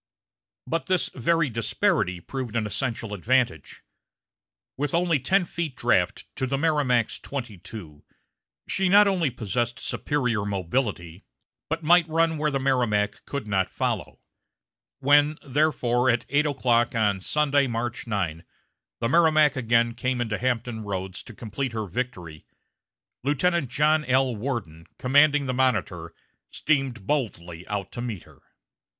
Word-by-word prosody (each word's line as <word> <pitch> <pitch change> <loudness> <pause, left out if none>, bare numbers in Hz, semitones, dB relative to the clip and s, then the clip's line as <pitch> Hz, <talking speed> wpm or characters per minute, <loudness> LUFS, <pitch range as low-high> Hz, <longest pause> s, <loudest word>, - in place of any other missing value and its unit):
But 165 -4 -2
this 185 -2 +1
very 165 +5 +1
disparity 105 -6 0
proved 125 +4 -6
an 110 -2 0
essential 115 0 -3
advantage. 115 - 0 0.9
With 145 +3 -1
only 170 -3 +2
ten 185 +8 +2
feet 165 -5 -4
draft 100 -6 +1
to 130 - -1
the 135 +1 -1
Merrimac's 140 -7 +1
twenty 120 -8 -6
two, 80 -8 -10 0.6
she 190 -1 +1
not 205 +2 +7
only 180 -6 +1
possessed 120 0 -2
superior 125 -8 -1
mobility, 95 -3 -2 0.5
but 160 +1 -2
might 170 +1 +5
run 165 0 +1
where 150 0 +1
the 140 -2 -1
Merrimac 120 -6 0
could 140 -6 -4
not 95 -3 0
follow. - - -3 0.8
When, 145 +2 +4
therefore, 130 -3 +1
at 120 -1 +1
eight 145 +3 +2
o'clock 125 -4 +1
on 105 -3 +2
Sunday, 145 +5 +2
March 120 0 -3
9, 90 -7 -2 0.6
the 115 - +1
Merrimac 155 -2 +4
again 115 -2 +2
came 125 +1 -2
into 110 -3 -2
Hampton 120 -2 -1
Roads 95 -3 -4
to 120 - -12
complete 120 +4 -4
her 110 -1 -2
victory, 90 -7 -5 0.8
Lieutenant 150 +1 +1
John 150 +3 +2
L. 130 -1 +2
Worden, 100 - -5
commanding 145 +3 +4
the 130 - -1
Monitor, 105 -10 -1 0.3
steamed 135 -8 -1
boldly 90 - -3
out 100 -2 -4
to 120 - -6
meet 115 -7 -5
her. - - -20
125 Hz, 135 wpm, -25 LUFS, 105-145 Hz, 0.9 s, not